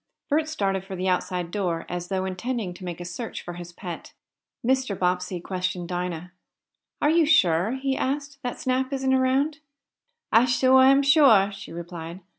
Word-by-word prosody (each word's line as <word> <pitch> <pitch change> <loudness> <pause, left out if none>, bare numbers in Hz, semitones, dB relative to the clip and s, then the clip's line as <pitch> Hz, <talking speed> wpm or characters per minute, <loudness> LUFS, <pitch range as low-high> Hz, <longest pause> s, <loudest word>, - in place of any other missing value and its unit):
Bert 310 +1 +2
started 195 -10 -1
for 190 0 -7
the 185 +1 -2
outside 180 -1 -1
door, 175 -5 -2
as 175 0 -4
though 190 0 -1
intending 195 +1 -3
to 185 - -12
make 175 -2 -5
a 175 - -6
search 200 +7 -6
for 175 - -7
his 175 0 -9
pet. 175 -1 -8 0.5
Mr. 255 -5 +1
Bobbsey 180 0 -1
questioned 180 -1 -3
Dinah. 180 -1 -4 0.7
"Are 295 - +4
you 325 -2 +4
sure," 180 - +3
he 265 0 -1
asked, 280 +1 -3
"that 245 - -4
Snap 260 +1 0
isn't 265 -1 +1
around?" 265 +4 +1 0.7
"I 230 +2 +6
suah 260 +1 +5
am 275 +1 +5
suah," 270 -9 +6
she 195 0 -10
replied. 170 +1 -7
195 Hz, 170 wpm, -25 LUFS, 180-265 Hz, 0.7 s, I